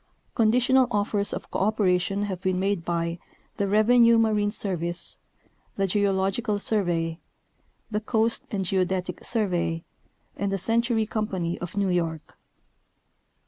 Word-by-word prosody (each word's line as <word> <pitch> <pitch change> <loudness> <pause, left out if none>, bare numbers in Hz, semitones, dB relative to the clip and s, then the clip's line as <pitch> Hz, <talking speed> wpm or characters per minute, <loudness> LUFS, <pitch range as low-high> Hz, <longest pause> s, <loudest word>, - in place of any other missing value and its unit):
i - - -42
Conditional 250 +3 +3
offers 205 0 +1
of - - -6
cooperation 195 -1 +1
have 190 -3 -4
been 185 -1 0
made 195 -2 0
b}^ 170 0 -2 0.4
the 200 - 0
Revenue 230 +3 +5
Marine 215 -2 +2
Service, 175 -5 -3 0.6
the 195 - +1
Geological 200 +2 0
Survey, 175 -6 -1 0.7
the 210 0 -1
Coast 225 +1 +1
and 195 -2 -2
Geodetic 185 -1 -1
Survey, 175 -7 0 0.5
and 200 0 -2
the 195 - 0
Century 230 +2 +1
Company 190 -6 -2
of 175 +3 -7
New 200 -1 +1
York. 165 -3 -2
200 Hz, 125 wpm, -25 LUFS, 180-215 Hz, 0.7 s, Revenue